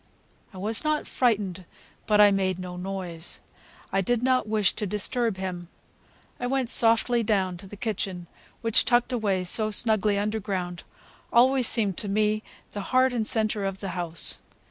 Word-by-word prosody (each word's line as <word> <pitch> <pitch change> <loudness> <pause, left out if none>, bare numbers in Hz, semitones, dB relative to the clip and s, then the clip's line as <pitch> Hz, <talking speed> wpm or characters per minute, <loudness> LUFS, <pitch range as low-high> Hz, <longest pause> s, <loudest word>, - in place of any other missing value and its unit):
I 190 - -13
was 215 +7 +3
not 305 0 -1
frightened, 200 -7 -1 0.4
but 210 -1 +2
I 205 -1 +7
made 190 -2 -1
no 180 -1 -7
noise. 180 -3 -5 0.5
I 195 - +2
did 240 +5 -1
not 255 -3 +1
wish 210 -3 +1
to 210 - -3
disturb 210 +2 -1
him. 180 -2 -5 0.7
I 245 - -3
went 260 -1 -1
softly 230 +1 +5
down 195 -4 -1
to 195 +2 -11
the 205 - -10
kitchen 195 -5 -4 0.4
which, 225 -2 +2
tucked 245 +1 +1
away 200 -6 -1
so 215 +4 +5
snugly 215 -2 +2
underground, 195 -4 -3 0.5
always 255 +1 +4
seemed 205 -6 +1
to 210 - -1
me 210 +1 0 0.3
the 205 - -5
heart 255 +4 +1
and 225 -3 -1
center 215 -2 +2
of 195 0 -4
the 195 - -5
house. 170 -2 0
210 Hz, 165 wpm, -25 LUFS, 190-230 Hz, 0.7 s, I